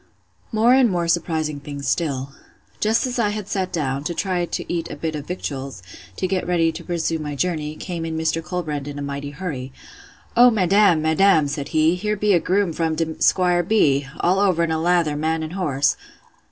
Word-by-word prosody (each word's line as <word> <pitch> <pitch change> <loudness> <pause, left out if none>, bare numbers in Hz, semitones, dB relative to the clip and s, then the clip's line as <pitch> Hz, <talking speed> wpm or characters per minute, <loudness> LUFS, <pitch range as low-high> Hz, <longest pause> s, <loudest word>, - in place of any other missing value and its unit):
More 225 +2 +4
and 260 -2 +5
more 175 -3 -1
surprising 160 -3 0
things 140 0 -7
still—— 140 -5 -1 0.5
Just 220 +3 +2
as 250 -1 -3
I 215 -3 +2
had 210 -1 -4
sat 190 -2 -2
down, 140 -4 -2
to 170 - -2
try 180 -2 -1
to - - -4
eat 170 -1 -2
a - - -6
bit 160 -1 -3
of 145 -1 -6
victuals, 135 - -5 0.3
to - - -2
get 185 -1 -1
ready 165 -2 +2
to 160 - -9
pursue 165 -2 -1
my 150 -1 -4
journey, 155 -1 -2
came 170 0 -5
in 160 -1 -3
Mr. 160 0 -1
Colbrand 155 -5 -4
in 145 0 -6
a 145 - -4
mighty 140 0 -4
hurry. 145 -5 -5 0.6
O 245 +1 +8
madam! 195 -5 +3
madam! 160 -1 +4
said 140 0 -4
he, 155 +1 +3
here 210 +4 -2
be 210 +1 +2
de 180 - +5
groom 185 0 +1
from 160 0 -1
de 160 0 -3
'Squire 180 -2 +3
B——, 145 -8 +2
all 185 +2 +2
over 185 -4 +2
in 165 - 0
a 160 0 0
lather, 170 -3 +2
man 160 +2 -1
and 155 +2 -6
horse! 140 -7 +1
165 Hz, 205 wpm, -22 LUFS, 150-185 Hz, 0.6 s, O